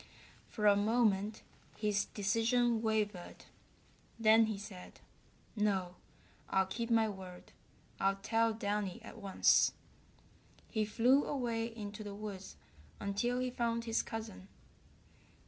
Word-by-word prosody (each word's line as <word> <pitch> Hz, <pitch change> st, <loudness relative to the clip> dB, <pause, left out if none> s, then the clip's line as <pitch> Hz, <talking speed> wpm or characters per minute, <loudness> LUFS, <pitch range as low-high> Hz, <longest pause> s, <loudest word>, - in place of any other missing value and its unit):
For 210 Hz, -, -3 dB
a 205 Hz, -1 st, +7 dB
moment 210 Hz, -1 st, +1 dB, 0.3 s
his 210 Hz, -1 st, +1 dB
decision 230 Hz, +3 st, +1 dB
wavered. 210 Hz, -5 st, -2 dB, 0.7 s
Then 225 Hz, 0 st, +5 dB
he 215 Hz, -2 st, -3 dB
said: 195 Hz, -3 st, -10 dB, 0.6 s
"No, 195 Hz, -4 st, 0 dB, 0.6 s
I'll 190 Hz, 0 st, +3 dB
keep 230 Hz, +5 st, -4 dB
my 225 Hz, -1 st, +4 dB
word. 190 Hz, -3 st, -9 dB, 0.5 s
I'll 195 Hz, 0 st, +2 dB
tell 225 Hz, +3 st, +1 dB
Downy 205 Hz, -3 st, -2 dB
at -, -, -10 dB
once." 200 Hz, -2 st, +4 dB, 1.0 s
He 215 Hz, -2 st, +1 dB
flew 245 Hz, +6 st, +3 dB
away 235 Hz, -5 st, -1 dB
into 215 Hz, -2 st, -7 dB
the 205 Hz, -1 st, -7 dB
woods 200 Hz, -2 st, -7 dB, 0.4 s
until 210 Hz, +5 st, -1 dB
he 255 Hz, 0 st, -1 dB
found 235 Hz, -1 st, -1 dB
his 225 Hz, 0 st, +1 dB
cousin. 220 Hz, -4 st, -7 dB
215 Hz, 115 wpm, -34 LUFS, 200-230 Hz, 1.0 s, a